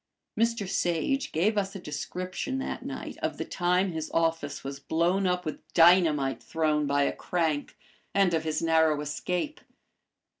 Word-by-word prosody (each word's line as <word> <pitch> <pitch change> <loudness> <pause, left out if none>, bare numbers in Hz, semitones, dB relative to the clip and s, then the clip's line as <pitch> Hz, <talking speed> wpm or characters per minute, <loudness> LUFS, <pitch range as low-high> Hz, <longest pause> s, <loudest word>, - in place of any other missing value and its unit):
Mr. 230 -2 +1
Sage 195 - 0
gave 205 +7 +2
us 195 0 -3
a - - -5
description 180 - -4
that 265 - -4
night - - -6
of - - -2
the - - -3
time 180 +1 +1
his 160 -1 -4
office 165 -3 -1
was 135 0 -6
blown 175 +6 +1
up 180 0 0
with 155 - -4 0.2
dynamite 165 -6 +5
thrown 155 -2 0
by 140 0 +2
a - - +1
crank, 160 -1 -1 0.3
and 195 -3 +3
of 160 -1 +1
his 155 0 -1
narrow 160 -2 +3
escape. 180 - -3
170 Hz, 155 wpm, -28 LUFS, 155-190 Hz, 0.3 s, dynamite